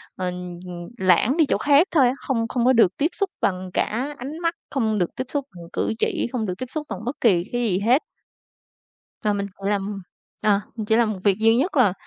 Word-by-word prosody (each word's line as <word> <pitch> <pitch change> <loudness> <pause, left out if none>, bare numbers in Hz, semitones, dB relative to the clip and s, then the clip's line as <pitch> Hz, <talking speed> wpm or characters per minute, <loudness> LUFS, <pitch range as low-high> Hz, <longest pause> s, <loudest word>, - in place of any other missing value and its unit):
ờ, 185 - -3 0.4
ừm, 175 -1 -7
lãng 190 - +3
đi 320 - +5
chỗ - - +1
khác 290 +5 +4
thôi 275 -6 +5
á. 250 - +1
Không 230 -4 0
không 245 0 0
có 260 - +5
được 225 -6 +4
tiếp 295 - +2
xúc 395 -1 -1
bằng 185 -1 -1
cả 265 +7 -1
ánh 285 +6 -6
mắt, 335 0 0 0.2
không 220 -6 0
được 175 -3 -1
tiếp 255 - -2
xúc 285 -2 -2
bằng 170 - -9
cử - - 0
chỉ, - - 0
không 235 -4 -1
được 180 - -2
tiếp 255 - -4
xúc 300 +1 -5
bằng 195 - -4
bất 250 - -2
kỳ 180 -7 +4
cái 240 0 -1
gì 195 -5 +1
hết. 245 +8 +3 1.2
Và 210 - +3
mình 200 0 -2
tự 195 0 -6
làm 200 -1 -2 0.4
ờ, 205 -1 +4 0.2
mình 215 -2 -4
chỉ 220 - +3
làm 225 -2 +3
một 190 - -6
việc 200 0 +3
duy 225 +1 +4
nhất 300 +4 0
là 215 -8 +5
225 Hz, 240 wpm, -23 LUFS, 200-265 Hz, 1.2 s, đi